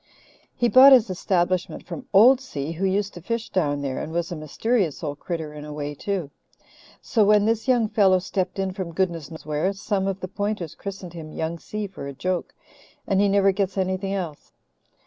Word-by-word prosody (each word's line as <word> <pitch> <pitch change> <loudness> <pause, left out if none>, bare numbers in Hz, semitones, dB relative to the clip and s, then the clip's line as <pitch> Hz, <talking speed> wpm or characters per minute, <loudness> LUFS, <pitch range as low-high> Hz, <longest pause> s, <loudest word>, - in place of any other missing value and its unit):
He 240 - +2
bought 265 +3 +9
his 230 -6 +5
establishment 180 -1 -1
from 260 - -8
'old 240 +7 +7
Si,' 150 - -5
who 180 +4 -1
used 200 +1 0
to 175 - -10
fish 230 +5 -3
down 145 -6 0
there 135 -2 -2
and 160 - -5
was 170 +1 -2
a - - -3
mysterious 170 - -1
old 145 -1 -4
critter 160 -4 -4
in 150 -1 -8
a 150 - -8
way 145 0 -4
too. 180 -2 -3 0.7
So 220 - +2
when 210 0 +5
this 225 +2 0
young 245 -4 +3
fellow 195 -3 +4
stepped 185 0 -2
in 190 -1 -1
from 185 -3 -5
goodness 170 -5 -1
knows 160 - -10
where, 155 +6 0
some 195 -1 -1
of 195 0 -2
the 185 - -5
Pointers 200 -3 -3
christened 190 -3 -8
him 160 -2 -8
Young 160 +2 -3
Si 210 +4 -5
for 190 -7 -8
a 140 - -6
joke, 180 +6 -3 0.5
and 195 0 +2
he 205 - +3
never 195 0 +4
gets 195 0 -2
anything 190 +1 -1
else. 170 -6 -6
185 Hz, 205 wpm, -24 LUFS, 165-205 Hz, 0.7 s, bought